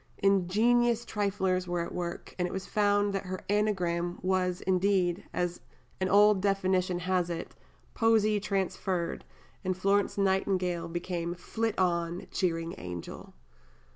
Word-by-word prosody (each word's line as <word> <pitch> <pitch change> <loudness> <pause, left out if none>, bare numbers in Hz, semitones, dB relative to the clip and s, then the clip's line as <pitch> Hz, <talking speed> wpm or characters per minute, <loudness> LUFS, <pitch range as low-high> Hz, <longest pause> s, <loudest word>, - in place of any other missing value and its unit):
Ingenious 225 +5 +3
triflers 190 -3 0
were 175 -1 -1
at 170 - -5
work, 175 -1 -5
and 180 - +1
it - - -7
was 190 0 -4
found 205 -1 +2
that 195 -1 -3
her 185 0 -4
anagram 180 -4 0
was 185 -1 0
indeed, 185 -1 +1
as 175 0 -2 0.4
an 185 0 0
old 205 0 +5
definition 185 -2 +1
has 180 -1 0
it, 170 -1 -5 0.4
poesie 215 -2 +3
transferred, 190 -3 -2 0.4
and 185 -1 -1
Florence 200 +2 +1
Nightingale 190 -3 +1
became 175 0 -3
"Flit 225 +5 -3
on, 170 -1 0
cheering 165 -2 -1
angel." 90 -1 -8
185 Hz, 130 wpm, -29 LUFS, 175-200 Hz, 0.4 s, old